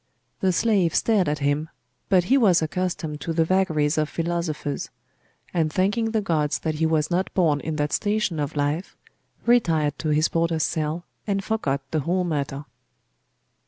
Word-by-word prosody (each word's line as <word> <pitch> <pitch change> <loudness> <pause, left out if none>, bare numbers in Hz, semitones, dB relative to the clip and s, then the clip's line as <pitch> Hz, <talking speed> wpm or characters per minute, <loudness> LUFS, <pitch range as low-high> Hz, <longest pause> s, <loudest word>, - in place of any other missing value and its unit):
The 190 - +2
slave 190 -3 +2
stared 205 -8 +2
at 150 - 0
him: 145 +2 0 0.4
but 185 -3 +4
he 250 +10 +3
was 195 -11 +4
accustomed 160 -3 -3
to 165 - -2
the 165 0 +2
vagaries 160 -5 +1
of 155 -1 0
philosophers; 165 -4 -3 0.6
and 160 -3 +1
thanking 205 +6 +1
the 220 -1 0
gods 155 -6 0
that 160 - -2
he 160 - +4
was 160 0 0
not 180 +2 0
born 160 -6 +3
in 155 +2 -4
that 150 -1 -1
station 205 -6 0
of 145 +1 -3
life, 145 +5 -2 0.5
retired 165 - +2
to 155 - -2
his 150 +2 +3
porter's 165 -1 0
cell, 160 +1 -2 0.2
and 195 -1 0
forgot 150 -12 -1
the 160 - +1
whole 180 +5 0
matter. 145 -4 -3
165 Hz, 165 wpm, -24 LUFS, 150-185 Hz, 0.6 s, but